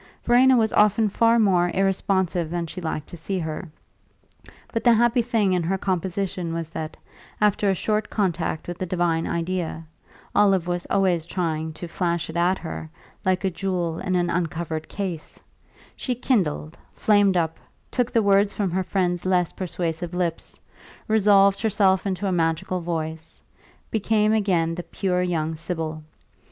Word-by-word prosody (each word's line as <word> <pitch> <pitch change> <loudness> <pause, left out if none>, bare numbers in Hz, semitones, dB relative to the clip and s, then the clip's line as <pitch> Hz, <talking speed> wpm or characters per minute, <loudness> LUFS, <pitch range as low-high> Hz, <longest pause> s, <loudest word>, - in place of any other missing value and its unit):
Verena 255 +2 +5
was 220 -2 +2
often 210 +1 +4
far 230 +3 +3
more 185 -5 +3
irresponsive 190 -3 +1
than 170 0 -2
she 180 +3 -7
liked 160 -2 -3
to - - -10
see 180 +4 -3
her; 160 +1 -4 1.0
but 230 - -1
the 240 - +6
happy 240 +2 +3
thing 225 -5 +1
in 180 - +1
her 180 +4 0
composition 185 -2 -2
was 165 -1 -4
that, 155 -1 -5 0.4
after 210 -1 +2
a 190 - +2
short 215 +3 -1
contact 175 -6 -1
with 175 0 -6
the 185 - -1
divine 170 -2 0
idea 170 -1 -3 0.5
Olive 195 -4 +4
was 175 0 -3
always 180 -4 +1
trying 160 -3 -2
to 170 +2 -7
flash 170 -1 -2
it - - -12
at 175 +2 +2
her, 160 -2 -7 0.4
like 185 +1 +2
a 190 - +1
jewel 175 -2 -2
in 185 -1 -1
an 175 -1 +1
uncovered 165 -2 -3
case 185 -6 -5 0.6
she 250 - -2
kindled, 180 - -1 0.2
flamed 205 -3 +3
up, 165 -1 -1 0.3
took 245 -1 0
the 230 - +3
words 200 0 +4
from 200 -4 -2
her 185 +2 0
friend's 180 -2 -1
less 180 -2 +1
persuasive 175 -1 -3
lips, 170 -2 -2 0.5
resolved 200 -2 +4
herself 200 -3 +2
into 190 0 -2
a 195 - +1
magical 165 +1 0
voice, 160 -1 -5 0.5
became 215 0 +2
again 180 -6 +1
the 175 - -4
pure 180 0 -1
young 160 -3 -1
sibyl. 160 -1 -4
180 Hz, 160 wpm, -24 LUFS, 165-200 Hz, 1.0 s, the